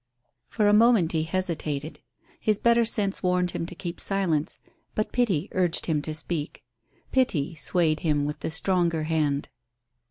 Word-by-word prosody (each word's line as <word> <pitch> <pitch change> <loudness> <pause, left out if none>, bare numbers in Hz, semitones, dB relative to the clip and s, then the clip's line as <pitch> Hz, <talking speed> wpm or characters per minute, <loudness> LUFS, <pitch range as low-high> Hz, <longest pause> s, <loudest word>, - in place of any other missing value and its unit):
For 210 - +1
a 205 - +5
moment 215 -6 +5
he 160 - +1
hesitated. 160 -4 -3 0.4
His 215 -2 +1
better 235 +1 +3
sense 205 -3 0
warned 180 -1 +1
him 165 - -4
to 180 - -9
keep 175 -2 -6
silence, 180 -5 0 0.4
but 215 - -1
pity 200 -9 +1
urged 180 -2 0
him 155 -3 0
to 155 +1 -3
speak. 160 -1 -4 0.5
Pity 175 - +1
swayed 160 0 0
him 145 -3 +1
with 150 +1 -4
the - - -3
stronger 170 -1 0
hand. 155 -3 0
170 Hz, 155 wpm, -26 LUFS, 155-195 Hz, 0.5 s, a